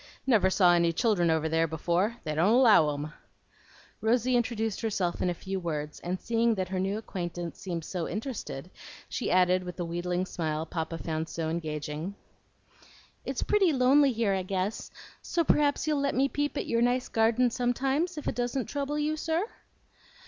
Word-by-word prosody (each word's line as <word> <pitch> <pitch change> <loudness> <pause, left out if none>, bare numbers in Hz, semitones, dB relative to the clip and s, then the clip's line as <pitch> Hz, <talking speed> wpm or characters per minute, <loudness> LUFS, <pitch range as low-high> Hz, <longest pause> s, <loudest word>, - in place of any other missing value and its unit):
Never 215 -8 +4
saw 180 -2 +5
any 170 -1 +3
children 175 -2 +2
over 160 -1 +1
there 160 +1 +2
before. 175 +8 0
They 155 - -2
don't 175 +8 +3
allow 220 - +6
'em." 145 +1 -5 0.9
Rosy 245 +3 +2
introduced 225 -3 -1
herself 195 -6 -1
in 180 - +1
a 175 - -2
few 190 +2 -4
words, 150 -4 -4
and 180 +1 -3
seeing 230 0 +1
that 185 -2 -2
her 190 -1 -2
new 195 +2 -1
acquaintance 175 -5 -5
seemed 170 -4 -4 0.2
interested, 195 - -5 0.4
she 250 - -3
added 185 0 +3
with 180 -1 -7
the 175 - -3
wheedling 175 +2 -2
smile 160 -3 -3
Papa 165 0 -4
found 160 0 -3
so 160 -1 -3
engaging, 155 +2 -4 1.1
"It's - - -2
pretty 395 -5 +3
lonely 275 +1 +4
here, 225 -4 +1
I 190 - 0
guess; 190 +3 -3 0.3
so 340 - 0
p'r'aps 295 -2 +2
you'll 300 -2 +1
let 280 0 0
me 270 +2 +3
peep 290 +1 -2
at - - -2
your 230 0 +1
nice 245 +1 +2
garden 230 +2 +2
sometimes 270 +8 0
if 300 - -5
it - - 0
doesn't 245 0 -1
trouble 285 +1 -3
you, 300 +1 0
sir?" 325 +4 -1
195 Hz, 175 wpm, -28 LUFS, 170-250 Hz, 1.1 s, allow